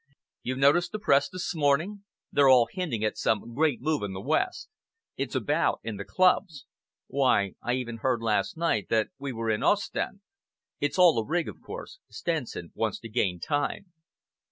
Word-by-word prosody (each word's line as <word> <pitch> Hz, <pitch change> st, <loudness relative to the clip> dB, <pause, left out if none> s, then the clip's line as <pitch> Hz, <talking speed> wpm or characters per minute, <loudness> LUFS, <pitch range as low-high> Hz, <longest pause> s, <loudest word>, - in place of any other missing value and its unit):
You 130 Hz, -, -3 dB
noticed 145 Hz, +9 st, +3 dB
the -, -, -1 dB
Press 140 Hz, -9 st, +3 dB
this 185 Hz, +1 st, -4 dB
morning? 165 Hz, +7 st, +1 dB, 0.3 s
They're 140 Hz, -1 st, +5 dB
all 125 Hz, -3 st, +6 dB
hinting 135 Hz, -, -2 dB
at 105 Hz, -, -2 dB
some 110 Hz, +1 st, 0 dB
great 145 Hz, -1 st, +1 dB
move 155 Hz, -2 st, 0 dB
in 100 Hz, -2 st, -3 dB
the 95 Hz, -, -5 dB
West. 370 Hz, -, -1 dB, 0.5 s
It's -, -, -4 dB
about -, -, +1 dB
in 110 Hz, -3 st, -4 dB
the 100 Hz, -, -5 dB
clubs. 180 Hz, -4 st, +2 dB, 0.4 s
Why, 125 Hz, -8 st, +2 dB
I 120 Hz, -, -1 dB
even 120 Hz, -2 st, -3 dB
heard 125 Hz, +1 st, 0 dB
last 105 Hz, +5 st, 0 dB
night 165 Hz, -11 st, 0 dB
that 110 Hz, -1 st, +2 dB
we 140 Hz, 0 st, -4 dB
were 115 Hz, -2 st, -2 dB
in 105 Hz, -, -1 dB
Ostend. 205 Hz, 0 st, 0 dB, 0.6 s
It's 145 Hz, -, -1 dB
all 175 Hz, -9 st, +6 dB
a -, -, -1 dB
rig, 170 Hz, +8 st, -1 dB
of -, -, -9 dB
course. -, -, -9 dB
Stenson 155 Hz, -, -4 dB
wants 110 Hz, -3 st, -1 dB
to 115 Hz, -, -8 dB
gain 95 Hz, -6 st, 0 dB
time." 150 Hz, -, -2 dB
140 Hz, 180 wpm, -27 LUFS, 115-170 Hz, 0.6 s, all